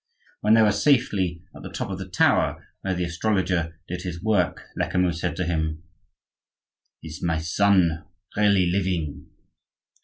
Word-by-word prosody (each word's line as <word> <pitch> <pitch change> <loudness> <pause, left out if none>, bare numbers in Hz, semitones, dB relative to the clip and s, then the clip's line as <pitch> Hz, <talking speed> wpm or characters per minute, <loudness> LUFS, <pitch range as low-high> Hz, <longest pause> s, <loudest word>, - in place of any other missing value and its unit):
When 105 +1 +4
they 110 - +6
were 105 - +4
safely 100 - +1
at - - -11
the - - -7
top - - -4
of 95 - -4
the 95 0 -7
tower, - - +2 0.2
where 95 -1 -1
the 90 - -1
astrologer 90 -2 -1
did 90 0 -4
his 90 -2 -5
work, 105 -6 +1
Lecamus 90 -2 0
said 90 - -1
to 90 - -2
him:— 80 -1 -2 1.2
"Is 80 +1 -8
my 80 -2 0
son 85 0 +2 0.3
really 100 -3 +4
living?" 90 -4 -1
90 Hz, 150 wpm, -24 LUFS, 85-100 Hz, 1.2 s, they